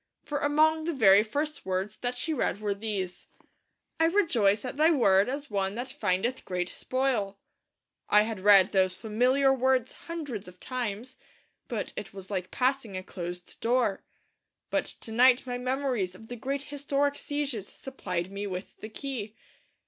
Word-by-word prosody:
For 290 -1 -2
among 310 +2 +3
the 335 -2 -1
very 200 -5 +7
first 290 +8 -3
words 190 +2 -2
that 245 0 -2
she 315 +6 -1
read 225 -8 0
were 210 -1 -1
these: 200 -3 -4 0.7
'I 325 - +5
rejoice 260 - +3
at 250 - -4
Thy 310 +3 +5
Word 205 - +4
as 280 -1 -5
one 195 0 0
that 245 +3 -4
findeth 210 +8 -1
great 180 -1 -2
spoil.' 250 -7 -1 0.7
I 210 0 +6
had 220 -2 -4
read 195 -1 +6
those 185 -1 +2
familiar 250 +6 +3
words 260 -1 +1
hundreds 290 - -5
of 180 0 -13
times, 250 0 -4 0.5
but - - -4
it 200 - -7
was 195 0 -8
like 185 -2 -2
passing 255 -6 0
a 185 - -5
closed 175 -1 -7
door. 235 -4 +1 0.7
But - - +1
to 225 - -7
night 250 +3 +5
my 245 -1 -3
memories 250 -7 -1
of 220 +4 -14
the 245 - -5
great 275 +3 -3
historic 285 0 0
sieges 285 -10 -3
supplied 185 -9 -5
me 200 +1 -4
with 185 0 -6
the 215 - -8
key. 225 -4 -5
230 Hz, 165 wpm, -28 LUFS, 195-270 Hz, 0.7 s, very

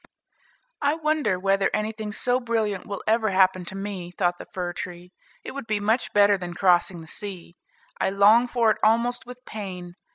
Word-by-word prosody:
"I 290 +1 +2
wonder 305 - 0
whether 195 +1 +2
anything 215 0 -3
so 245 +3 +1
brilliant 225 -5 -2
will 200 -2 -5
ever 220 0 +2
happen 185 -1 +3
to 190 - -7
me," 195 -3 -5
thought 175 -1 -1
the - - -9
fir 175 -1 -3
tree. 175 0 -7 0.3
"It - - -6
would 275 -4 -7
be 215 -2 0
much 220 +5 0
better 205 -1 +4
than 175 -1 -6
crossing 175 -2 +2
the 160 - -12
sea. 180 -2 -8 0.4
I - - +1
long 210 +5 +5
for 235 -2 +2
it - - -1
almost 235 +3 +2
with 250 0 -11
pain. 180 -4 -7
205 Hz, 185 wpm, -25 LUFS, 185-225 Hz, 0.4 s, long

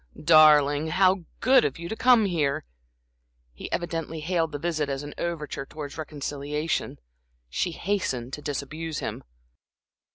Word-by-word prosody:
"Darling, 150 -2 +6
how 185 +1 +3 0.2
good 255 0 +5
of 135 - -1
you 170 0 -6
to 220 - -4
come 240 -2 +5
here!" 150 - 0 0.9
He - - -8
evidently 165 -2 -3
hailed 165 -1 0
the 145 - -4
visit 155 -2 -1
as 135 +1 -3
an 145 - -7
overture 155 -5 -3
towards 145 -2 -7
reconciliation. 150 0 -3 0.5
She 175 - 0
hastened 135 -11 -2
to 150 - -5
disabuse 150 +2 -4
him. - - -4
155 Hz, 135 wpm, -26 LUFS, 145-170 Hz, 0.9 s, Darling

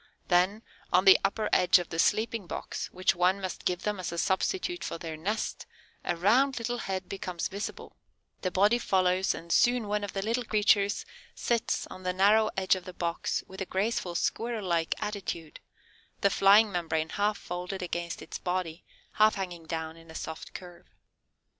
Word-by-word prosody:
Then, 185 +5 +3 0.3
"on 185 +1 +4
the 190 - +9
upper 210 +2 0
edge 180 +1 +6
of 175 -2 -4
the 165 - -4
sleeping 215 0 +1
box, - - -5
which 185 +1 +1
one 180 +3 +2
must 185 -2 -5
give 180 0 0
them 210 -2 -1
as 180 - -4
a 170 - -5
substitute 355 - 0
for - - -4
their 165 -1 -6
nest, 205 +8 -3 0.4
a 175 - -1
round 250 +10 +3
little 240 +1 -2
head 190 -3 -3
becomes 180 -3 -4
visible; 200 +2 -6 0.5
the 185 - 0
body 205 +6 +3
follows 185 -2 +2
and 170 +1 -8
soon 240 +1 +3
one 210 0 -1
of 205 - -5
the 195 - -2
little 230 +4 0
creatures 210 -2 +2 0.3
sits 235 -2 0
on 185 - -10
the 185 0 -1
narrow 210 +4 +4
edge 190 -1 +3
of 185 -1 -7
the 185 - -8
box 170 -1 -2
in 190 - -12
a - - -1
graceful 190 -2 -1
Squirrel 230 +2 -1
like 170 -2 +1
attitude, 190 -6 -5 0.6
the 200 - +4
flying 200 +3 +6
membrane 160 -3 -1
half 205 +3 0
folded 180 +2 -5
against 170 -1 -4
its - - -7
body, 180 -2 -3 0.3
half 215 0 +4
hanging 175 -4 -5
down 160 0 -4
in 165 0 -16
a 160 - -11
soft 160 0 -7
curve. 175 -2 -10
190 Hz, 180 wpm, -29 LUFS, 175-210 Hz, 0.6 s, the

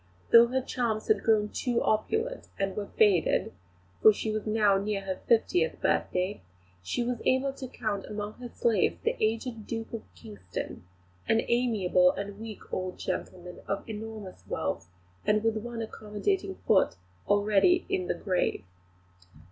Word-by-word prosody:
Though 235 0 +9
her 260 +2 0
charms 225 -4 -2
had 215 -2 +4
grown 215 -2 +3
too 240 +1 0
opulent 445 - 0
and 195 -1 -1
were 205 -1 -3
faded 200 -6 +3 0.5
for 215 - +9
she 215 +1 -3
was 215 0 -3
now 210 -2 +3
near 200 0 -2
her 190 -1 -4
fiftieth 175 -8 +2
birthday 185 +3 0 0.4
she 90 - -1
was 245 0 -2
able 265 +1 +2
to 270 -1 -7
count 210 -4 -3
among 210 0 -4
her 245 -1 -7
slaves 230 -4 +1
the - - +1
aged 225 0 -1
Duke 225 0 -5
of 230 - -3
Kingston, 90 -4 -7 0.4
an 225 - +3
amiable 215 -7 +3
and 200 0 -6
weak 220 -2 -9
old 185 0 -3
gentleman 180 -1 -5
of 200 - -3
enormous 215 -3 -7
wealth, 80 +2 -3 0.3
and 210 0 +2
with 225 -1 +1
one 230 +1 -4
accommodating 225 - -2
foot 190 - +4 0.3
already 205 - +4
"in 375 -2 -1
the - - 0
grave." 185 - 0
215 Hz, 150 wpm, -29 LUFS, 195-235 Hz, 0.5 s, Though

